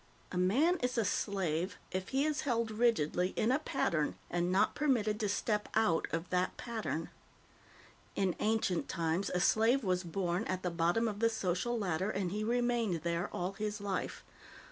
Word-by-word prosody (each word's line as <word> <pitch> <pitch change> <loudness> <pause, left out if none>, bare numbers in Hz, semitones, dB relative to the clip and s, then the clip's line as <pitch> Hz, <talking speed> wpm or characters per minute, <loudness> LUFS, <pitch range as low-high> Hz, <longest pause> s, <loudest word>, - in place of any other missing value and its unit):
A 180 - -3
man 275 - +3
is 250 0 -1
a 225 - +2
slave 185 -2 -1
if 185 0 -3
he 270 +2 +1
is 305 -1 0
held 230 -5 0
rigidly 200 -6 +1
in 225 - +2
a 265 - +3
pattern 170 - 0 0.2
and 175 +1 0
not 190 - +3
permitted 225 -8 +1
to 210 -3 0
step 210 +1 0
out 215 -7 +2
of 165 +2 -2
that 180 0 0
pattern. 220 -8 -3 1.0
In 190 -3 +1
ancient 215 -5 0
times, 170 +3 0
a 180 - 0
slave 225 +8 +3
was 185 -2 +1
born 175 +2 -1
at 185 0 -3
the 180 - -1
bottom 170 +7 +2
of 210 -2 -3
the 230 0 +4
social 220 +2 -1
ladder, 190 -2 -1
and 190 -4 -1
he 210 +2 -2
remained 235 -7 +1
there 170 0 -1
all 180 +2 -2
his 210 +1 -3
life. 200 -1 -3
200 Hz, 175 wpm, -33 LUFS, 180-230 Hz, 1.0 s, the